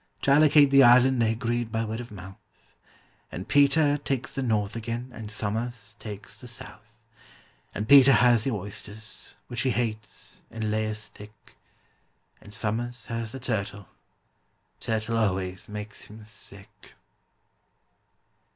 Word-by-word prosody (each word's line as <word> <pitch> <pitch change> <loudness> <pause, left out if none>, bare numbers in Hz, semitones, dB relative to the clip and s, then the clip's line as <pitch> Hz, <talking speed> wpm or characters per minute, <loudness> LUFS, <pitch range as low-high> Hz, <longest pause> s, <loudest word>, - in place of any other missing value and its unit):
To 135 - +3
allocate 145 -1 +6
the 140 0 +7
island 125 0 +6
they 110 -1 +3
agreed 115 0 -2
by 115 0 -1
word 110 +1 -4
of 120 0 -7
mouth, 95 -1 -14 0.6
And 90 - -6
PETER 145 +1 +4
takes 135 -3 -3
the 135 - -1
north 110 -4 0
again, 115 +2 -4
and 110 -2 -7
SOMERS 110 0 -3
takes 100 -2 -8
the 125 - -9
south; 115 -2 -9 0.9
And 105 +1 -3
PETER 140 0 +8
has 120 -3 +5
the 135 - 0
oysters, 105 +1 -6
which 120 0 -3
he 130 - +1
hates, 110 -2 -3
in 110 -1 -3
layers 110 0 -1
thick, 105 0 -15 0.9
And 105 - -13
SOMERS 115 +4 -2
has 115 -1 -3
the 135 - -6
turtle—turtle 110 0 -5
always 95 -4 -1
makes 105 0 -7
him 110 +1 -12
sick. 105 -1 -11
110 Hz, 135 wpm, -27 LUFS, 105-120 Hz, 0.9 s, PETER